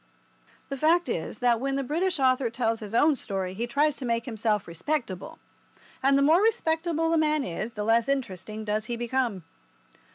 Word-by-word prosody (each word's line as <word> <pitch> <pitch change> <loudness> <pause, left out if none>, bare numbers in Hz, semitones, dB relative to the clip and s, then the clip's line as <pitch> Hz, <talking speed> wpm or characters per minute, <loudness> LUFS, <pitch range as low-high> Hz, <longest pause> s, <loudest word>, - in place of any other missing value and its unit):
The 275 - -4
fact 335 +5 +3
is - - -3
that 235 -2 +4
when 270 +2 -1
the 275 - -1
British 335 +5 -1
author 255 -2 +3
tells 230 -1 -1
his 215 0 -6
own 295 +4 +5
story 190 -6 -4
he 230 +5 -3
tries 290 +4 +2
to - - -8
make 230 -1 -1
himself 215 -4 -1
respectable, 185 - -4 0.6
and 275 +1 +4
the 280 - +3
more 320 +6 +5
respectable 330 -6 +1
a 325 - +3
man 305 -2 +2
is 215 +5 -4
the 210 - -4
less 230 +4 +2
interesting 215 -5 -3
does 215 0 -1
he 240 - -3
become. 240 -5 -1
250 Hz, 185 wpm, -27 LUFS, 220-300 Hz, 0.6 s, own